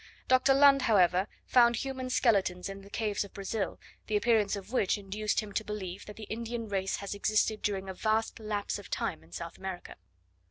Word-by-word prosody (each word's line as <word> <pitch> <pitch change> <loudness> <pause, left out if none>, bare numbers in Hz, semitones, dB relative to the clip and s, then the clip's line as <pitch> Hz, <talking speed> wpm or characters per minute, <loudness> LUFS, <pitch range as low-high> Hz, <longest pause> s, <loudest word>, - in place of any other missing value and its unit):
Dr. 260 +1 +5
Lund, 275 0 +7
however, 190 -4 +4 0.2
found 240 -1 +5
human 260 +1 -4
skeletons 195 -8 +2
in 195 0 -7
the 200 - -14
caves 210 -1 -1
of 200 - -13
Brazil, 200 +1 -3 0.3
the 215 - +2
appearance 210 -2 +2
of 200 +2 -8
which 215 -6 +2
induced 210 +2 -1
him 210 -1 -8
to 215 - -1
believe 200 -3 -6
that 210 - -9
the 220 - -9
Indian 230 +1 -4
race 195 -2 -1
has 200 0 -5
existed 215 +1 +1
during 195 -2 -2
a 190 - -4
vast 220 +4 0
lapse 210 -2 -3
of - - -12
time 80 - -2
in 80 - -21
South 165 - -7
America. 190 -2 -6
210 Hz, 195 wpm, -30 LUFS, 195-225 Hz, 0.3 s, Lund